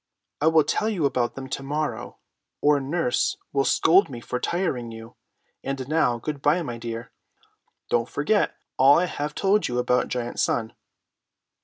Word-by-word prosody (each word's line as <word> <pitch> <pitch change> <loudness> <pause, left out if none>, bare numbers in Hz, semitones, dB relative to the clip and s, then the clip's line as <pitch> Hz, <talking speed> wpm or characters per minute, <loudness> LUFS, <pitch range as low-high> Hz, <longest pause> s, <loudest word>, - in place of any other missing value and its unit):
I 155 - +3
will 160 -1 +5
tell 215 +9 0
you 185 -9 0
about 125 -3 0
them 135 -1 -7
to - - -3
morrow, 150 +3 -3 0.4
or 145 -1 +4
nurse 140 -1 0 0.2
will 135 -1 +2
scold 175 +9 +4
me 125 -3 -7
for 125 +1 -4
tiring 130 -9 -2
you. 115 +1 -11 0.5
And 135 -1 -4
now, 150 -6 +2
good 145 +4 -5
by, 155 +5 +2
my 120 -5 -5
dear. 115 0 -6 0.8
Don't 115 0 +1
forget 200 +9 +1 0.2
all 135 +2 +7
I 180 - +2
have 150 -3 -4
told 200 +1 +2
you 120 - -3
about 125 0 +1
Giant 120 -1 -4
Sun." 110 -2 0
140 Hz, 165 wpm, -25 LUFS, 120-160 Hz, 0.8 s, all